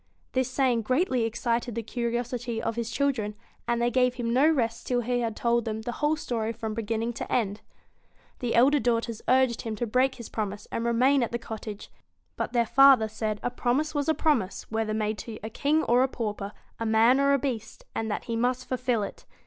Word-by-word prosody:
This 260 -1 0
saying 255 -3 +2
greatly 255 - +1
excited 235 +1 -1
the 230 - -2
curiosity 240 0 -2
of 225 0 -2
his 235 -1 -3
children, 235 -6 -1 0.3
and 235 0 +1
they 240 0 +1
gave 250 0 +2
him 235 -2 -2
no 275 +5 +5
rest 230 -7 0
till 245 -1 +1
he 245 +1 0
had 230 -2 -2
told 235 +1 +1
them 220 0 -4
the 240 - -3
whole 300 +1 +3
story 230 -6 -2
from 220 -1 -4
beginning 225 +1 -2
to - - -6
end. 210 -3 0 0.8
The 245 -2 -1
elder 275 +5 +5
daughters 230 -2 0
urged 255 -2 +3
him 225 -2 -4
to 240 - -2
break 255 +4 +2
his 235 -3 -8
promise 205 -1 -4
and 230 - -2
remain 255 +4 +3
at 235 - -1
the 235 - -1
cottage; 220 -2 -8 0.4
but - - -3
their 235 -1 +2
father 270 -2 +6
said 215 0 -3
that - - -5
a - - -3
promise 265 +6 0
was 290 +1 0
a 315 - +3
promise, 255 - 0
whether 220 -1 -1
made 215 0 -1
to 225 -2 -7
a 220 - -5
king 300 +7 +1
or 245 +1 +3
a 260 - +4
pauper, 210 -5 -4 0.3
a 230 - -2
man 225 +4 +5
or 280 0 +4
a - - +5
beast, 240 -5 -4
and 225 - -2
that 210 - -2
he 230 - -3
must 250 +2 0
fulfil 250 -4 0
it. - - -8
235 Hz, 215 wpm, -27 LUFS, 225-255 Hz, 0.8 s, father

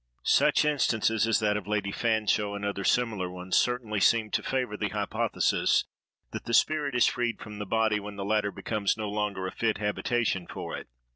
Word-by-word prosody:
SUCH - - +4
instances 115 -7 +2
as 115 - +3
that 105 -1 +2
of 100 -2 -7
Lady 105 -2 -1
Fanshawe, 110 -2 0
and 100 0 -4
other 100 -1 -2
similar 110 -6 +1
ones, 90 0 -4
certainly 120 -4 +1
seem 110 +2 +3
to - - 0
favor 125 -5 -2
the - - -2
hypothesis - - +1 0.5
that - - -6
the 115 - +1
spirit 150 -4 +2
is 125 - +5
freed 120 -2 -1
from 105 -1 -9
the 105 - -5
body 110 0 +2
when 105 0 -8
the 100 -1 -5
latter 105 -1 +1
becomes 105 -1 -1
no 110 -1 -3
longer 105 -2 -2
a 95 - -3
fit 110 -2 -1
habitation 105 -2 -1
for - - -6
it. - - -8
105 Hz, 195 wpm, -28 LUFS, 100-115 Hz, 0.5 s, is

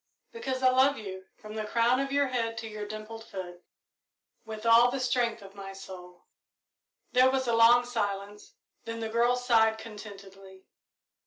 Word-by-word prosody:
"Because 265 - -4
I 255 - +6
love 265 +2 +3
you, 190 -3 -8
from 215 0 -11
the 215 0 -3
crown 235 +3 +2
of 275 0 -2
your 280 -1 +2
head 230 -3 -2
to 225 0 -5
your 210 -1 -7
dimpled 215 +1 -8
foot, 180 -4 -9 0.8
with 220 0 -8
all 230 +1 +6
the 270 +2 -3
strength 240 -3 0
of 195 0 -13
my 195 -1 -9
soul." 180 -2 -12 0.9
There 255 +1 +5
was 260 -1 -1
a 235 - +1
long 235 +2 +6
silence, 205 -3 -4 0.3
then 230 0 -5
the 225 -1 -4
girl 235 +2 +2
sighed 225 -3 +3
contentedly. 195 -3 -12
225 Hz, 165 wpm, -28 LUFS, 200-245 Hz, 0.9 s, I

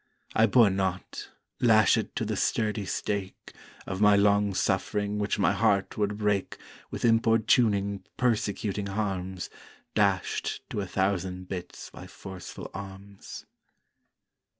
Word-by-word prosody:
I 110 +1 +4
bore 115 -2 +5
not, 95 -1 -3 0.3
lashèd 110 -3 +4
to - - -1
the - - -2
sturdy 105 -2 0
stake, 100 -1 -4 0.3
Of 95 +1 -4
my 105 -1 +6
long 100 0 +3
suffering, 105 +2 0
which 105 0 0
my - - +3
heart 100 -1 +1
would 105 -1 -1
break 105 -2 -1 0.3
With - - -3
importuning 110 -3 +3
persecuting 105 -4 0
harms 95 -3 -3 0.4
Dasht 100 -4 0
to 105 - -2
a 100 - -4
thousand 95 -1 -1
bits 90 -2 -7
by - - -11
forceful 95 -2 -9
arms. 100 0 -9
100 Hz, 120 wpm, -28 LUFS, 95-105 Hz, 0.4 s, my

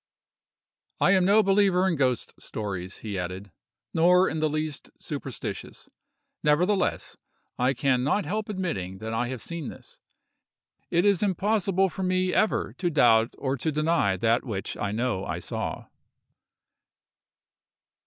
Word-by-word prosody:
"I - - +4
am 190 -2 +4
no 210 +3 +5
believer 195 -2 +3
in 180 - +1
ghost 130 -4 0
stories," 95 -3 -5
he 100 -3 -3
added, 90 +2 -6 0.4
"nor 180 +3 +5
in 160 - -2
the 155 0 +1
least 155 -1 -3
superstitious; - - -6 0.5
nevertheless, 180 +6 +1 0.4
I 130 +2 +2
can 130 -3 +1
not 150 +9 +1
help 215 +2 -3
admitting 130 - -3
that 110 +3 -5
I 115 +2 0
have 130 -2 -5
seen 170 -5 -5
this: - - -13 0.9
it 170 +3 +2
is 200 -3 +3
impossible 195 -1 +1
for 185 - -7
me 185 0 +1
ever 215 - +1
to 175 - +1
doubt 120 -7 +4
or 135 -1 -1
to 155 +6 -1
deny 155 - +1
that 115 +4 +2
which 105 -7 -4
I 105 - -2
know 115 -3 -1
I 85 - -3
saw." 85 - -4
155 Hz, 140 wpm, -26 LUFS, 115-185 Hz, 0.9 s, no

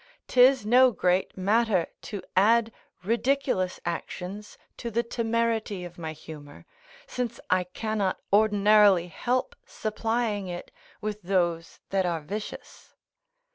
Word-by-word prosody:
'Tis 255 -2 +5
no 255 +4 +6
great 180 -2 0
matter 205 -1 +2 0.2
to 205 -3 -6
add 225 +4 +4 0.3
ridiculous 235 -3 0
actions 180 +4 -5 0.2
to 235 - -5
the 235 +1 0
temerity 230 -4 -1
of 175 0 -11
my 160 -1 -4
humour, 150 -2 -11 0.4
since 245 - -4
I 185 0 +3
cannot 205 +1 -2
ordinarily 205 -3 +5
help 250 +8 -1
supplying 220 -2 -2
it 175 -1 -7 0.3
with 210 0 -4
those 175 -3 -1
that 190 -2 +1
are 170 -2 -1
vicious. 205 +8 -8
210 Hz, 115 wpm, -27 LUFS, 180-230 Hz, 0.4 s, no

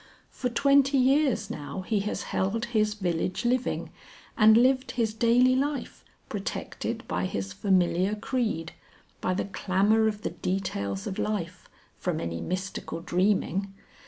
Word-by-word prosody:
For 250 - -2
twenty 275 +2 +4
years 270 +1 +2
now 150 +6 -5
he 210 +2 0
has - - -3
held 215 +5 0
his 215 -1 +2
village 180 0 -2
living 250 +1 0 0.4
and 220 0 +7
lived 255 +1 +3
his 225 -3 +1
daily 240 +3 +4
life, 280 +1 -2 0.2
protected 200 -2 -4
by 90 +1 -1
his 95 +1 -4
familiar 185 0 +2
creed, 215 -8 -2 0.5
by 185 - 0
the - - -1
clamour 205 +3 +2
of 210 -1 -3
the - - -2
details 100 - -3
of 190 - -4
life, 185 -4 -3 0.3
from - - -1
any 85 0 -4
mystical 185 -2 -4
dreaming. 195 +2 0
210 Hz, 135 wpm, -27 LUFS, 180-240 Hz, 0.5 s, and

